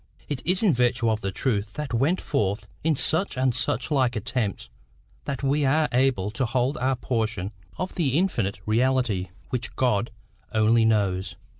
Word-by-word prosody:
It 140 -4 -3
is 185 +4 +3
in 195 -7 +5
virtue 120 -1 +2
of 110 0 -1
the 95 -1 -2
truth 100 -2 -1
that 150 -4 -5
went 140 +10 +2
forth 105 +1 -1 0.2
in 160 0 +2
such 160 +3 +1
and 130 -1 +2
such 125 +5 0
like 130 -4 +2
attempts 110 -1 -2 0.6
that 140 -1 -4
we 140 +2 +2
are 150 +3 +3
able 120 -6 +2
to 125 +4 -1
hold 125 +4 0
our 130 -1 +1
portion 110 -6 -2 0.3
of 185 - -3
the 145 -6 +1
infinite 115 - 0
reality 115 -5 +1 0.2
which 125 -1 -3
God 115 -3 +1 0.4
only 110 +1 +4
knows. 100 -4 +1
125 Hz, 165 wpm, -25 LUFS, 110-135 Hz, 0.6 s, in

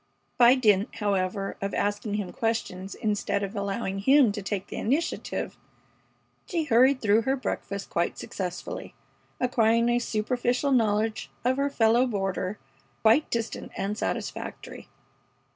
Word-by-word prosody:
By 245 +1 +8
dint, 210 -5 +2
however, 195 -2 -1
of 200 0 -2
asking 205 +1 -1
him 205 -4 -3
questions 200 -4 -2
instead 205 -2 -1
of 200 +2 -4
allowing 200 0 -2
him 265 +2 +5
to 205 - -5
take 195 -1 -3
the - - -8
initiative, 290 +9 -1 0.9
she 335 -3 -1
hurried 260 0 +4
through 215 +1 +4
her 265 +3 +1
breakfast 200 -6 -4
quite 170 0 0
successfully, 180 -2 -5 0.4
acquiring 235 -2 +3
a 240 0 +3
superficial 245 +4 0
knowledge 220 -2 +1 0.2
of 255 +1 +2
her 280 +1 +1
fellow 235 -1 +3
boarder 195 -2 -2 0.5
quite 225 +8 +4
distant 230 -1 -3
and 200 +2 -2
satisfactory. - - -5
220 Hz, 130 wpm, -27 LUFS, 200-245 Hz, 0.9 s, By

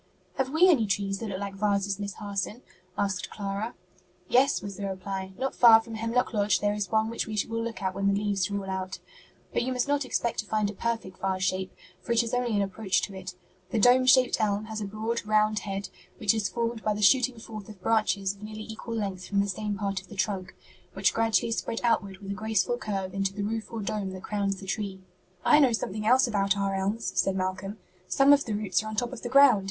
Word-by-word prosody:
'" - - -37
"Have 265 -1 +1
we 320 +6 +5
any 265 - +4
trees 195 0 -1
that 225 - -4
look 190 -1 -4
like 200 -1 -4
vases, 200 0 0
Miss 200 -1 -4
Harson?" 205 +3 -4 0.3
asked 195 -2 -1
Clara. 205 +3 -4 0.5
"Yes," 270 +6 +4
was 200 -1 -7
the 200 +1 -4
reply; 190 0 -4
"not 265 +1 -2
far 230 -2 +8
from 225 0 -9
Hemlock 230 +2 0
Lodge 205 -3 +2
there 205 0 +1
is 205 -3 -3
one 220 0 +2
which 230 - -3
we 215 -1 -4
will 230 0 -2
look 230 -3 -5
at 190 -1 0
when 195 +1 -1
the 200 0 +2
leaves 205 -2 0
are 200 - -2
all 195 - -7
out. 190 0 -3 0.6
But - - +1
you 255 +2 -1
must 250 +1 0
not 285 0 +1
expect 240 -2 -1
to 210 - -3
find 215 -1 0
a - - -11
perfect 225 -3 -3
vase 190 -1 -1
shape, 185 0 -1 0.3
for 235 - -1
it 235 0 +4
is 230 - -5
only 245 -3 +1
an 200 - +2
approach 195 0 0
to 200 - -4
it. 185 -1 -7 0.3
The 235 - -1
dome 250 +4 +5
shaped 255 -2 +5
elm 210 0 0
has 220 0 -5
a - - -2
broad, 220 +3 -3
round 215 0 +2
head, 195 -1 -4 0.3
which 205 -1 +3
is 215 -4 -1
formed 230 +2 -2
by 215 -1 0
the 210 - -2
shooting 250 +4 +4
forth 215 -2 -9
of 210 -3 -11
branches 200 -2 +1
of 200 - -19
nearly 215 0 -7
equal 220 +1 -6
length 195 -4 -3
from 200 - 0
the 200 - +2
same 205 +1 -3
part 195 -1 -2
of 190 - -19
the 205 - -11
trunk, 190 0 -2 0.4
which 195 0 +2
gradually 225 0 +2
spread 230 0 -2
outward 200 -5 +1
with 195 0 -7
a - - -1
graceful 220 +3 0
curve 195 -6 -3
into 195 0 -1
the 205 - -2
roof 220 +1 -3
or 225 -2 -4
dome 195 -1 -3
that 185 - -8
crowns 200 -2 -1
the 195 - -9
tree." 195 -1 -3 0.5
"I 300 - +7
know 265 -5 +5
something 215 -1 -2
else 255 +3 +6
about 200 -4 +1
our 195 0 0
elms," 200 +4 -1
said 195 - +2
Malcolm: 190 +2 -3 0.3
"some 275 +6 +5
of 285 0 +3
the 220 - -3
roots 200 -3 0
are 215 - -7
on 215 - -5
top 245 +3 -1
of 255 - -7
the - - -4
ground. 275 -4 +7
210 Hz, 240 wpm, -28 LUFS, 195-230 Hz, 0.6 s, far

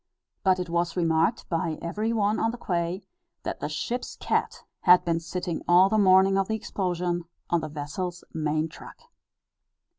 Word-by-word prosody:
But 190 -2 +4
it 180 - -3
was 170 +1 -1
remarked 165 +5 +1
by 165 -2 -1
every 210 +7 -2
one 210 -1 +1
on 225 - +2
the 240 - -5
quay, 175 -2 -2 0.4
that - - -4
the - - -3
ship's 245 +1 -3
cat - - -1 0.2
had 180 -1 +6
been 165 -1 +1
sitting 175 0 -4
all 180 +2 +6
the 215 +1 +2
morning 190 0 +5
of 195 - 0
the 220 - 0
explosion, 175 -4 -2 0.3
on 170 -1 +3
the 155 - -5
vessel's 155 +5 -5
main 155 0 0
truck. 165 - -12
175 Hz, 170 wpm, -26 LUFS, 165-195 Hz, 0.4 s, had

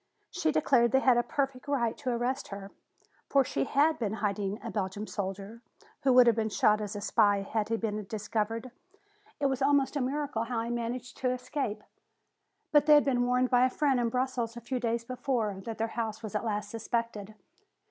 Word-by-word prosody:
She 320 -4 0
declared 240 -6 +3
they 265 - +6
had 255 -2 +4
a - - +5
perfect 270 +1 -3
right 240 -5 0
to 260 - -3
arrest 250 +3 -1
her. 195 0 -8 0.6
For 275 -1 +4
she 135 - -1
had 305 +3 +2
been 215 -3 -1
hiding 205 -1 -2
a 230 - -5
Belgian 200 0 -3
soldier 200 +2 -5 0.4
who 265 - +3
would 250 0 +8
have 235 -2 +4
been 220 -1 0
shot 210 +1 +3
as 210 0 -4
a 205 - -4
spy 205 -1 +3
if 215 -2 -1
he 225 - 0
had - - -4
been 215 -1 -2
discovered. 220 +3 -3 0.7
It 290 - 0
was 270 -1 0
almost 280 0 +3
a 285 - 0
miracle 270 -3 -2
how 230 -1 -2
he 235 - -4
managed 240 +1 -4
to 255 - 0
escape. 255 -2 -3 0.9
But 295 0 +4
they 300 - +8
had 295 - +5
been 245 -3 +1
warned 250 +1 +2
by 245 0 +5
a 255 - +4
friend 270 -1 +1
in 235 -1 +1
Brussels 250 -2 -2
a - - -7
few 255 +2 -3
days 235 -1 -1
before, 235 -6 -2
that 225 -2 -5
their 225 +1 -1
house 225 -1 -4
was 215 - -6
at 210 - -1
last 210 -2 -2
suspected. 225 -2 -3
235 Hz, 210 wpm, -29 LUFS, 215-255 Hz, 0.9 s, would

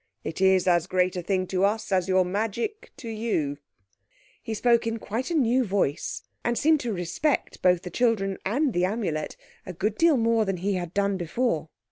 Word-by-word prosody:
It 160 - -5
is 190 -1 +4
as 175 -1 +3
great 185 0 +1
a 180 - -2
thing 185 +1 0
to 185 0 0
us 210 +1 0
as 185 -1 +2
your 185 -1 +3
magic 225 - -3
to 270 -4 -9
you." 215 -11 -2 0.8
He 225 -2 -4
spoke 235 +1 +3
in 225 0 -1
quite 225 +4 -4
a 340 - -1
new 255 -3 +3
voice, 190 - -1 0.2
and 240 0 0
seemed 310 0 +4
to 245 -4 -3
respect 195 - -1
both 180 -1 +3
the 180 - -7
children 200 -4 +1
and 260 +6 0
the 175 - +1
Amulet 185 -6 -2 0.3
a 185 - -7
good 205 +5 -2
deal 330 -4 +5
more 230 -1 +2
than 195 -3 -2
he 195 +3 -1
had 175 -2 -4
done 200 -1 +1
before. 175 -2 -1
200 Hz, 195 wpm, -26 LUFS, 180-230 Hz, 0.8 s, deal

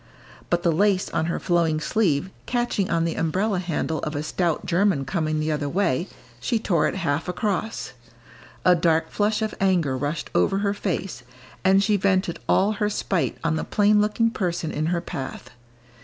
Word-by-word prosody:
But 175 0 +1
the 170 - +3
lace 190 +3 +2
on 160 - 0
her 170 - -1
flowing 170 -3 +1
sleeve 185 -2 0 0.2
catching 240 -6 0
on 165 -1 +1
the 165 - -1
umbrella 185 +5 0
handle 160 -2 -2
of 150 - -4
a 145 - -2
stout 170 +1 -1
German 180 -5 +2
coming 155 0 -1
the 155 +1 0
other 145 -1 -1
way, 180 -2 0 0.3
she 225 - 0
tore 180 -8 +1
it - - -3
half 145 +4 -1
across. 210 - -2 0.7
A 180 - +7
dark 165 -2 +1
flush 210 +1 +1
of 215 - -2
anger 175 -8 +2
rushed 145 +4 -3
over 195 - +2
her 200 - +1
face, 190 - -3 0.4
and 195 +1 +5
she 210 0 +2
vented 185 -2 +1
all 200 +3 +4
her 210 0 0
spite 190 -4 -1
on 165 -1 +1
the - - -2
plain 210 0 +3
looking 225 +2 +1
person 175 -6 -2
in 155 +1 -1
her 170 0 0
path. 135 -6 -6
175 Hz, 180 wpm, -24 LUFS, 160-200 Hz, 0.7 s, A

